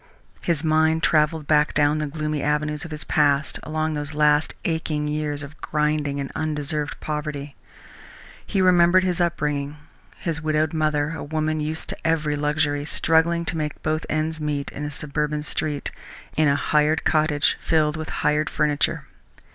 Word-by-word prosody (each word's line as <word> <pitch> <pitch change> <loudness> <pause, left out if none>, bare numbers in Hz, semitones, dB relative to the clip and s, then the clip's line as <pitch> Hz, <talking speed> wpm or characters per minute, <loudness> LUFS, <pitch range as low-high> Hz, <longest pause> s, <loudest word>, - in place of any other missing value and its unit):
His 165 -3 0
mind 160 0 +3
travelled 155 0 +2
back 150 0 +3
down 150 +1 +3
the 150 - -1
gloomy 150 0 -2
avenues 150 0 0
of 175 - -7
his 155 -1 -5
past, 145 -1 +2
along 155 0 -2
those 145 0 -4
last 150 0 +3
aching 160 -2 -1
years 150 -1 -2
of 145 +2 -11
grinding 150 -2 0
and 135 -1 -4
undeserved 150 -1 -2
poverty. 150 -2 -4 0.9
He 195 -3 0
remembered 180 0 +5
his 180 -1 0
upbringing, 150 -4 -1 0.4
his 165 -2 -3
widowed 155 0 +1
mother, 155 -1 +1
a - - -5
woman 155 +1 -1
used 155 +1 -3
to - - -4
every 155 -2 +1
luxury, 145 0 0
struggling 165 +2 +2
to 165 - -1
make 150 -2 -4
both 155 +1 -1
ends 155 +1 -1
meet 145 -2 -2
in 150 - -5
a - - -3
suburban 150 +1 -2
street, 150 -1 -2 0.4
in 155 0 +3
a 140 - +4
hired 150 +2 +2
cottage 155 -2 +2
filled 155 -2 +2
with 155 0 -5
hired 150 +1 +1
furniture. 150 -2 0
150 Hz, 160 wpm, -23 LUFS, 150-155 Hz, 0.9 s, remembered